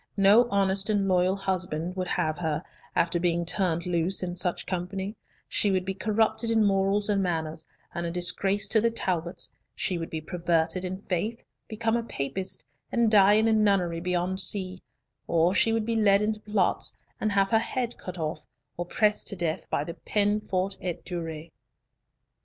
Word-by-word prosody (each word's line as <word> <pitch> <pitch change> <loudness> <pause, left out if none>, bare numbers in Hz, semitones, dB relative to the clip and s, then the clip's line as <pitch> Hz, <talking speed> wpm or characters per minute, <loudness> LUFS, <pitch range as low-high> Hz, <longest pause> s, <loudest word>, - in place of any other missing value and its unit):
No 205 +5 +6
honest 195 0 +1
and 205 -2 +1
loyal 185 0 +3
husband 185 -3 -2
would 185 -1 -2
have 155 -2 -1
her, 160 -1 -2 0.3
after 170 0 +2
being 170 0 0
turned 170 -2 0
loose 180 +2 +2
in 175 -1 -3
such 180 -1 +1
company; 190 +3 -4 0.3
she 205 - +1
would 185 -1 0
be 190 - -2
corrupted 220 +3 +1
in 225 -1 +3
morals 195 +1 +2
and 205 -2 +2
manners, 160 -3 -3 0.3
and 170 - -3
a 170 - -2
disgrace 190 +3 0
to 220 - +4
the 230 - +3
Talbots; 180 -6 -2 0.2
she 180 -2 -1
would 165 - -5
be 160 - -4
perverted 170 +1 0
in 185 +1 -3
faith, 205 +4 -3 0.2
become 225 +1 -1
a 235 - +1
Papist, 185 0 -3 0.3
and 235 -2 +2
die 205 -1 +6
in 220 +1 +4
a 225 - +3
nunnery 195 -6 +2
beyond 180 +1 -1
sea; 185 -2 +2 0.5
or 170 +2 +3
she 225 - +3
would 225 -1 0
be 230 0 -1
led 205 -2 +4
into 215 0 -1
plots 210 -4 0 0.2
and 215 -1 0
have 195 0 +3
her 225 - +4
head 245 +1 -2
cut 185 -1 -7
off; 155 -2 -3 0.3
or 175 0 -4
pressed 210 +2 +2
to 200 - +1
death 170 -1 -3
by 145 - 0
the 170 - -6
peine 205 +3 0
forte 190 -1 -2
et 180 -2 -4
dure. 165 -3 -5
190 Hz, 180 wpm, -27 LUFS, 175-210 Hz, 0.5 s, No